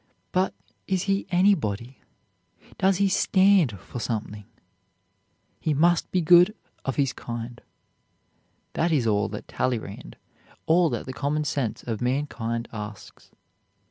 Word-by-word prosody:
but 185 Hz, 0 st, +1 dB, 0.3 s
is 190 Hz, -1 st, 0 dB
he 195 Hz, 0 st, 0 dB
anybody? 140 Hz, -, +1 dB, 0.8 s
does 190 Hz, -1 st, +3 dB
he 200 Hz, +1 st, +3 dB
stand 190 Hz, -, +3 dB
for 120 Hz, -, -8 dB
something? 105 Hz, -3 st, -4 dB, 1.1 s
He 155 Hz, -, 0 dB
must 170 Hz, +3 st, +3 dB
be 185 Hz, -, +2 dB
good 175 Hz, +5 st, +6 dB, 0.3 s
of 135 Hz, -, -2 dB
his 135 Hz, -3 st, +1 dB
kind. 120 Hz, 0 st, -7 dB, 1.1 s
That 170 Hz, +1 st, +1 dB
is 140 Hz, -7 st, +2 dB
all 105 Hz, -2 st, +1 dB
that -, -, -7 dB
Talleyrand, 115 Hz, -6 st, -3 dB, 0.5 s
all 170 Hz, +1 st, +4 dB
that -, -, -3 dB
the 130 Hz, -, -6 dB
common 145 Hz, +5 st, -1 dB
sense 140 Hz, -6 st, -2 dB
of 115 Hz, -2 st, -4 dB
mankind 125 Hz, -3 st, -2 dB
asks. 105 Hz, -1 st, -9 dB
140 Hz, 125 wpm, -25 LUFS, 115-180 Hz, 1.1 s, good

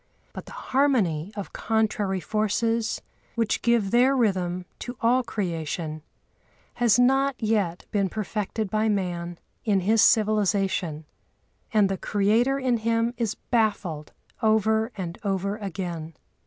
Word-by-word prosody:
But -, -, -8 dB
the -, -, -10 dB, 0.2 s
harmony 210 Hz, -, +2 dB
of 200 Hz, -2 st, -6 dB
contrary 210 Hz, -3 st, 0 dB
forces, 225 Hz, +4 st, 0 dB, 0.3 s
which 230 Hz, -2 st, 0 dB
give 235 Hz, -5 st, +2 dB
their 255 Hz, +3 st, +4 dB
rhythm 185 Hz, -6 st, 0 dB
to 245 Hz, 0 st, -6 dB
all 245 Hz, +3 st, +3 dB
creation, 165 Hz, -7 st, -3 dB, 0.7 s
has 235 Hz, -3 st, +3 dB
not 270 Hz, +2 st, +3 dB
yet 210 Hz, -6 st, 0 dB
been 200 Hz, -2 st, +1 dB
perfected 215 Hz, +1 st, -3 dB
by 215 Hz, +1 st, +1 dB
man 175 Hz, -4 st, -2 dB, 0.3 s
in 200 Hz, -4 st, +2 dB
his 215 Hz, +4 st, +3 dB
civilisation, 195 Hz, -7 st, +2 dB, 0.7 s
and 210 Hz, -4 st, +4 dB
the 195 Hz, 0 st, -2 dB
Creator 220 Hz, +6 st, +2 dB
in 255 Hz, -3 st, +1 dB
him 230 Hz, +1 st, 0 dB
is 225 Hz, -3 st, -2 dB
baffled 205 Hz, -9 st, -1 dB, 0.3 s
over 220 Hz, +1 st, +2 dB
and 175 Hz, -3 st, -5 dB
over 200 Hz, 0 st, -1 dB
again. 175 Hz, -6 st, -5 dB
210 Hz, 125 wpm, -25 LUFS, 185-230 Hz, 0.7 s, their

